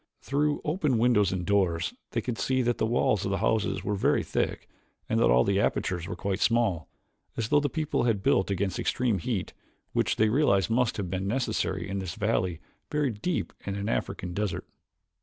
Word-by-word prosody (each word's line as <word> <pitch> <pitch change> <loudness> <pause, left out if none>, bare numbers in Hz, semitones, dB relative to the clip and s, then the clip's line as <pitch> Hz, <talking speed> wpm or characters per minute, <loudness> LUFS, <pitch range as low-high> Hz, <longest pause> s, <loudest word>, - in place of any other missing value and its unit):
Through 145 +2 0
open 150 -5 +1
windows 110 -5 +3
and 90 -1 -2
doors 95 - +1 0.2
they 115 - -1
could 120 0 -4
see 130 -1 +1
that 120 0 0
the 110 - +2
walls 115 -3 +2
of - - -1
the 95 - 0
houses 105 -3 0
were 105 - -1
very 100 - +2
thick - - -2 0.4
and - - +1
that - - +4
all 60 +1 +4
apertures 90 -4 0
were 90 - -4
quite 95 +1 -2
small, 110 - +1 0.5
as 115 -1 -1
though 150 - +5
the 145 0 0
people 155 -3 -1
had 105 -5 +1
built 95 - +3
against 95 -1 -1
extreme 120 -7 0
heat, 100 -1 -3 0.4
which - - +1
they 110 0 +3
realized 115 -6 +3
must 125 0 +2
have 95 -4 -3
been 95 +1 -2
necessary 105 -6 -1
in 100 0 -3
this 95 -1 -5
valley 95 -6 0 0.3
buried 140 -8 -1
deep 180 +2 -1
in 100 - -3
an 100 +2 -3
African 90 -5 -2
desert. 95 -3 -2
105 Hz, 195 wpm, -28 LUFS, 95-125 Hz, 0.5 s, though